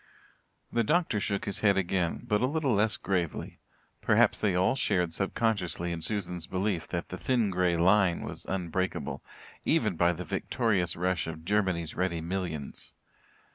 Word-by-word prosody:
The 115 - +2
doctor 155 -3 +2
shook 100 0 -1
his 100 - -3
head 100 -2 +3
again, 90 -2 0
but 105 0 +2
a 125 - +3
little 145 -3 0
less 105 +1 +2
gravely; 90 -5 -2 0.4
perhaps - - +3
they 100 -4 +2
all 90 +1 +3
shared 90 -10 +1
subconsciously 95 -4 -1
in 85 -1 -4
Susan's 90 -4 -2
belief 95 -3 -1
that 85 -1 -4
"the 90 - -6
thin 120 -6 +1
grey 90 -2 +2
line" 95 0 +4
was - - -6
unbreakable, 95 0 -2 0.4
even 110 - +2
by 85 +1 +3
the 90 +1 -6
victorious 100 -1 0
rush 90 -1 0
of 80 0 -7
Germany's 95 -5 0
ready 90 -2 -1
millions. 85 -4 -4
95 Hz, 155 wpm, -29 LUFS, 85-105 Hz, 0.4 s, line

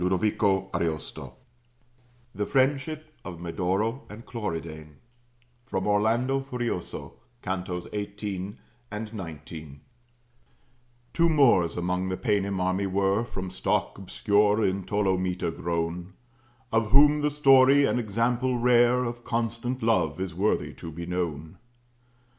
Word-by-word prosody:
OSCAR 95 +1 +1
KUHNS] 80 -3 -2 1.2
THE 105 +1 -2
FRIENDSHIP 140 +3 +1 0.2
OF 90 -3 -8
MEDORO 95 - -1
AND 110 +3 -10
CLORIDANE 80 -8 -5 0.7
From 95 -7 -3
'Orlando 115 +6 +2
Furioso,' 120 -8 -5 0.2
Cantos 90 -2 -3
18 100 -1 -4 0.3
and 105 +1 -6
19 80 -6 -8 1.3
Two 170 0 +3
Moors 115 - +4
among 90 +1 -1
the 95 - -2
Paynim 100 -4 0
army 95 +2 0
were, 100 +3 +1
From 95 -6 -6
stock 95 - -1
obscure 105 +2 +2
in 95 0 -1
Ptolomita 95 -3 0
grown; 85 +2 -3 0.6
Of 115 -1 +1
whom 145 +4 +6
the 150 - +2
story, 140 -1 +6
an 125 - +1
example 120 +3 0
rare 120 +1 +4
Of 120 0 -5
constant 115 +2 -2
love, 90 -9 +1
is 95 -2 -3
worthy 100 +5 0
to 80 - -8
be 85 +2 -6
known. 85 -4 -4
100 Hz, 115 wpm, -27 LUFS, 90-120 Hz, 1.3 s, whom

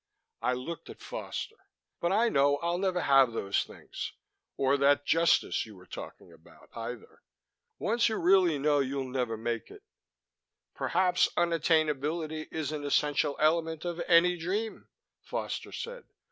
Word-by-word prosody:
I 125 - +1
looked 130 +6 -6
at - - -10
Foster. - - -6 0.3
"But 170 - 0
I 220 +4 +3
know 145 -7 +3
I'll 170 +3 -1
never 185 -2 0
have 135 -5 +5
those 100 -3 0
things - - -8 0.4
or 135 +1 +3
that 140 +1 +3
Justice 165 +1 +3
you 110 - -12
were 90 -1 -15
talking 85 - -10
about, 80 0 -19
either. 115 0 -7 0.6
Once 235 +2 +2
you 220 - -1
really 180 -3 +4
know 145 +1 +2
you'll 135 0 -1
never 125 -3 -2
make 115 0 -3
it...." - - -14 0.9
"Perhaps 180 0 +2
unattainability 155 -2 +1
is 155 -2 -3
an 150 -1 -4
essential 145 0 +1
element 160 +1 +1
of 175 0 -3
any 175 +1 +5
dream," 200 +7 -3 0.3
Foster - - -4
said. 485 +1 -7
155 Hz, 145 wpm, -30 LUFS, 135-175 Hz, 0.9 s, have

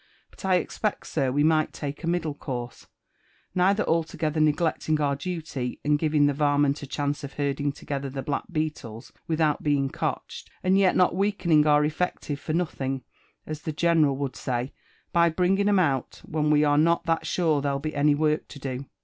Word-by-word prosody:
But - - -15
I 190 -1 +3
expect, 205 +3 -2
sir, 135 -5 0
we 145 +3 +2
might 155 0 +2
take 145 +3 -6
a - - -3
middle 170 -3 0
course 125 -4 -6 0.3
— - - -42 0.3
neither 195 +3 +3
altogether 160 -1 -1
neglecting 155 0 +1
our 140 -2 +1
duty 145 -5 -4
and 150 0 +3
giving 150 -2 +3
the 145 - +2
varment 145 0 +2
a 145 - -7
chance 145 +2 -2
of 140 - -7
herding 145 0 -1
together, 140 0 -5
the 135 0 -5
black 145 - -2
beetles, 150 -9 -4
without 155 -2 +1
being 140 -2 +1
cotched, - - -4
and 185 +1 +3
yet 195 -1 +4
not 180 -1 +3
weakening 180 -6 +2
our 150 0 +5
effective 155 -2 -2
for 155 - -4
nothing, 135 -6 -2 0.4
as 155 0 -6
the 155 - -3
general 155 -3 +2
would 140 -2 -3
say, 125 +1 -3 0.4
by 170 0 +5
bringing 190 +4 +2
'era 205 - +4
out, 140 -8 -1
when 150 -1 -1
wd 150 0 +4
are 145 0 +4
not 170 +2 +3
that 165 -1 0
^ure 160 -2 +1
there'll 140 -1 0
be 155 +3 -4
any 145 0 +3
work 155 +1 0
to - - -11
do. 135 -1 -5
150 Hz, 190 wpm, -26 LUFS, 140-165 Hz, 0.4 s, our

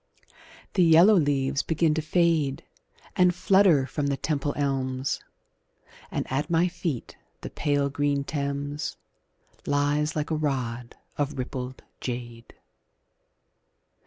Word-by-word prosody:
The 190 - +2
yellow 170 +5 +7
leaves 140 -5 +2
begin 160 -1 +1
to 160 - -1
fade 155 -4 +1 0.5
And 180 -1 +4
flutter 185 -7 +4
from 145 +1 -2
the 140 -1 0
Temple 145 0 -2
elms, 135 -2 -1 0.9
And - - -2
at 145 +4 -1
my 170 +1 +3
feet 170 -7 -4 0.3
the - - -7
pale 145 -1 0
green 145 0 0
Thames 145 +1 -3 0.7
Lies 145 +2 +1
like 150 +1 -2
a - - +2
rod 125 -6 -3 0.2
of 145 0 -1
rippled 130 0 -5 0.2
jade. 120 -2 -6
145 Hz, 115 wpm, -26 LUFS, 135-160 Hz, 0.9 s, yellow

